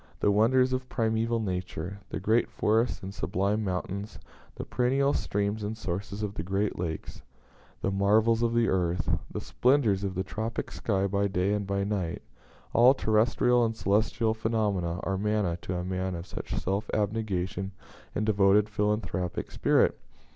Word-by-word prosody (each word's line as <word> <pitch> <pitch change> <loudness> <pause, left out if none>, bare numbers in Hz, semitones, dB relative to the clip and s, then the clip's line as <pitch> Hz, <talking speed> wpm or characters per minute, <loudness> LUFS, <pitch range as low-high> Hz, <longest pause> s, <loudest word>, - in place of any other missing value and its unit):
The 105 - +3
wonders 125 +5 +4
of 130 0 -3
primeval 115 0 0
nature, 90 -2 -4
the - - -3
great 110 +5 +2
forests 115 +1 +1
and 95 +1 -6
sublime 100 +3 0
mountains, 100 +2 -3 0.4
the - - -6
perennial 135 +3 +1
streams 100 +2 -1
and 105 +2 -3
sources 100 +1 -4
of 100 -1 -3
the 90 - -4
great 95 +3 -1
lakes, 80 -3 -4 0.6
the 100 - +1
marvels 110 +4 +3
of 115 0 +1
the 115 -1 +3
earth, 90 -2 0 0.2
the - - -4
splendors 120 -7 +2
of 95 -1 -2
the 95 - -1
tropic 110 +3 -4
sky 100 -3 0
by 100 +1 +1
day 95 +1 0
and 100 -1 -2
by 100 0 0
night 100 -5 -2 0.5
all 125 +3 +6
terrestrial 120 +2 +3
and 115 -1 0
celestial 110 +2 +1
phenomena 105 -6 -1
are 95 -1 -1
manna 105 -4 +1
to 90 - -4
a 90 - -2
man 95 0 -2
of 85 +1 -6
such - - -5
self 100 +10 -2
abnegation 100 -3 -1 0.4
and 105 - 0
devoted 105 0 +4
philanthropic 105 -4 -1
spirit. - - +2
105 Hz, 160 wpm, -28 LUFS, 95-110 Hz, 0.6 s, all